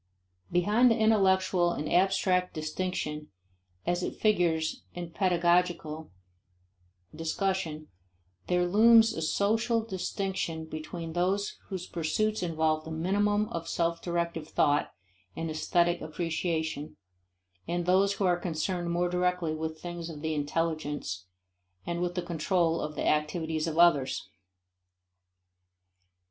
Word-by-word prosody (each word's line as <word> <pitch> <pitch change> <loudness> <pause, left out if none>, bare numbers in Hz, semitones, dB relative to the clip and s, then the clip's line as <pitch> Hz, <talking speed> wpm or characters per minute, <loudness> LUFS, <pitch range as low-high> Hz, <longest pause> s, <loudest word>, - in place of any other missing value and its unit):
Behind 210 +8 +4
the 230 - +3
intellectual 190 -5 +3
and 150 - -4
abstract 185 0 +2
distinction 155 -1 -3 0.6
as 175 +1 0
it - - -3
figures 170 -7 +1
in 175 -1 -6
pedagogical 175 -3 +1 1.1
discussion, 165 -2 -2 0.6
there 180 0 +2
looms 225 +4 +6
a 160 - -4
social 225 +7 +1
distinction 190 -5 -3
between 160 +1 -6
those 190 +4 0
whose 185 -3 -5
pursuits 210 +7 -1
involve 160 -2 0
a - - -6
minimum 205 +6 +1
of 165 0 -5
self 170 0 0
directive 170 -2 -2
thought 145 -1 +2 0.4
and 165 -1 -3
aesthetic 170 +2 +1
appreciation, 160 -1 -3 0.7
and 175 +1 -1
those 190 +2 +3
who 200 0 -1
are 175 -1 +2
concerned 175 +1 -2
more 175 +1 +1
directly 180 -2 0
with 160 0 -4
things 175 -1 -6
of 150 -3 -8
the 160 0 -1
intelligence 145 - -2 0.6
and 170 0 -2
with 175 0 -1
the 180 - -1
control 170 0 0
of 150 0 -4
the - - -2
activities 155 +1 0
of 160 -1 -3
others. 170 -6 +3
175 Hz, 120 wpm, -29 LUFS, 160-185 Hz, 1.1 s, looms